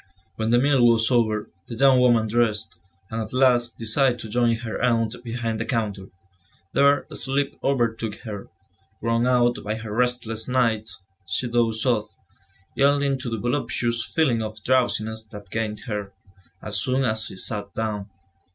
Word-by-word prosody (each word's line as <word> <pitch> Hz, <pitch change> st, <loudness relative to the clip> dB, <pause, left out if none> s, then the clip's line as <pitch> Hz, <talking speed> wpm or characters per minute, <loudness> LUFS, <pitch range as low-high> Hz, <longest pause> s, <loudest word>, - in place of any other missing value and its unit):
When 110 Hz, 0 st, -1 dB
the 120 Hz, -, +5 dB
meal 135 Hz, 0 st, +3 dB
was 115 Hz, 0 st, +4 dB
over, 110 Hz, -3 st, +1 dB, 0.2 s
the 115 Hz, -, -6 dB
young 135 Hz, +1 st, +5 dB
woman 120 Hz, -3 st, +4 dB
dressed, 110 Hz, -1 st, 0 dB, 0.3 s
and 115 Hz, 0 st, -2 dB
at 110 Hz, -, -6 dB
last 125 Hz, -2 st, +3 dB
decided 120 Hz, +3 st, +2 dB
to 110 Hz, -, -7 dB
join 120 Hz, +1 st, +2 dB
her 115 Hz, -1 st, -5 dB
aunt 115 Hz, -2 st, +1 dB
behind 115 Hz, -2 st, -3 dB
the 115 Hz, -, -2 dB
counter. 105 Hz, -6 st, -2 dB, 0.7 s
There, 140 Hz, 0 st, +4 dB
sleep 140 Hz, +1 st, -1 dB
overtook 115 Hz, -5 st, 0 dB
her; 105 Hz, -4 st, -7 dB, 0.5 s
worn 115 Hz, +1 st, +1 dB
out 120 Hz, -1 st, +3 dB
by 110 Hz, +1 st, -2 dB
her 110 Hz, -1 st, -7 dB
restless 115 Hz, -2 st, 0 dB
nights, 115 Hz, -6 st, 0 dB, 0.2 s
she 95 Hz, +7 st, -1 dB
dozed 115 Hz, -1 st, +1 dB
off, 115 Hz, -4 st, 0 dB, 0.6 s
yielding 140 Hz, -1 st, +2 dB
to 130 Hz, -, -4 dB
the 115 Hz, -, -2 dB
voluptuous 120 Hz, -1 st, -1 dB
feeling 130 Hz, -7 st, +1 dB
of 110 Hz, -1 st, -6 dB
drowsiness 110 Hz, -3 st, +1 dB
that 105 Hz, -3 st, -12 dB
gained 110 Hz, -1 st, -2 dB
her, 105 Hz, -3 st, -5 dB, 0.5 s
as 100 Hz, -2 st, -3 dB
soon 130 Hz, +4 st, 0 dB
as 110 Hz, -2 st, 0 dB
she -, -, -7 dB
sat 100 Hz, +1 st, -1 dB
down. 105 Hz, -2 st, -3 dB
115 Hz, 160 wpm, -24 LUFS, 110-125 Hz, 0.7 s, the